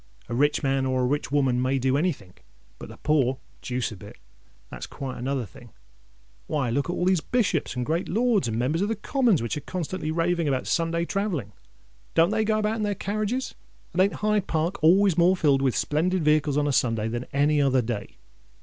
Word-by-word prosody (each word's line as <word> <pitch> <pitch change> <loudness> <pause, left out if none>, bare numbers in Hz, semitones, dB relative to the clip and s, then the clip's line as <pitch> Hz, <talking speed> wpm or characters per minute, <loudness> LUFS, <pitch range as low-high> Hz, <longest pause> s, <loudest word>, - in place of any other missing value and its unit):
"A 120 - -5
rich 145 +5 +2
man 135 -1 +1
or 130 -1 0
a - - +2
rich 145 +1 -1
woman 135 -4 +2
may 130 +2 +1
do 130 0 +1
anythink; 140 - -3 0.4
but - - -9
the - - -11
poor—deuce 130 -3 -1
a - - -7
bit! 100 +2 -12 0.5
That's - - -7
quite 135 -2 -6
another 130 0 -2
thing. 120 +3 -15 0.8
Why, 135 -6 -1
look 140 +7 -1
at - - 0
all 180 - -1
these 185 -3 +3
Bishops, 185 - 0
and 125 -1 -2
great 165 +5 -1
Lords, 220 - +2
and 110 -1 -2
Members 140 +8 0
of 200 - +1
the 225 - -1
Commons, 225 - +1
which 115 - -2
are - - -4
constantly 180 -1 -4
raving 170 0 0
about 130 -2 0
Sunday 170 0 0
travelling: 175 - -2 0.6
don't 165 +4 +4
they 220 0 +1
go 215 0 +1
about 215 +1 0
in - - -3
their 205 -1 0
carriages? 215 +7 -2 0.4
and 185 - +2
ain't 195 +1 +3
Hyde 210 -2 +1
Park 165 +1 -1
always 180 +1 +5
more 180 +2 +4
filled 140 -5 +3
with 130 -3 +1
splendid 170 +4 0
vehicles 150 -2 +2
on 150 - +2
a - - +1
Sunday 115 -3 +1
than 120 +2 -4
on - - -26
any 145 +1 +2
other 130 -2 +2
day? 110 -3 -5
150 Hz, 210 wpm, -25 LUFS, 130-185 Hz, 0.8 s, always